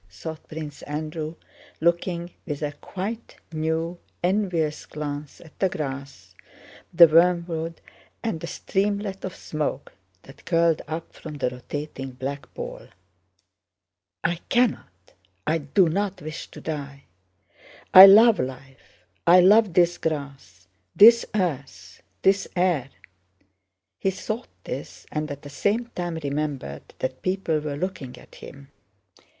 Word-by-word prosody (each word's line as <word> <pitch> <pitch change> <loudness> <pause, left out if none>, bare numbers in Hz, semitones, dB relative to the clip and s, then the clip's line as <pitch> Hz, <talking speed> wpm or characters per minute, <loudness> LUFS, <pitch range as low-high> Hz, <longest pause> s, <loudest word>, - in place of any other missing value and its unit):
thought 155 - -8
Prince 155 -2 -7
Andrew, 155 +2 -5 0.4
looking 170 +1 0 0.2
with 150 -1 -4
a 145 - -1
quite 205 +9 -6 0.2
new, 160 +2 -2 0.2
envious 175 -5 0
glance 145 -1 -6
at 160 -3 -17
the 190 - +2
grass, 135 - -6 0.6
the 170 0 +9
wormwood, 165 0 +2 0.4
and 225 -8 -2
the 170 - -6
streamlet 200 +1 -2
of 185 - -5
smoke 150 -2 -4 0.3
that 135 - -16
curled 165 -2 +2
up 160 +1 -6
from 155 -2 -9
the 130 -3 -1
rotating 135 +1 -6
black 135 +3 -6
ball. - - -7 1.4
"I 170 - +1
cannot, 150 - 0 0.3
I 160 +2 +1
do 160 +5 +3
not 195 +3 -1
wish 155 +2 -7
to - - -12
die. 140 -3 -6 0.9
I 190 +1 +13
love 220 +3 +7
life—I 130 - 0
love 205 +1 +5
this 175 -1 +3
grass, 140 - -5 0.3
this 230 +2 +8
earth, 135 - -3 0.2
this 195 +1 +3
air...." 175 -8 +1 1.1
He 195 - +1
thought 215 +5 -4 0.2
this, - - -7
and 150 0 -2
at 145 0 -7
the 145 - -9
same 220 - 0
time 175 -2 -3
remembered 140 - -4
that 130 0 -4
people 185 -4 0
were 150 -1 -4
looking 150 -7 -5
at - - -17
him. 140 0 -12
160 Hz, 125 wpm, -25 LUFS, 140-185 Hz, 1.4 s, I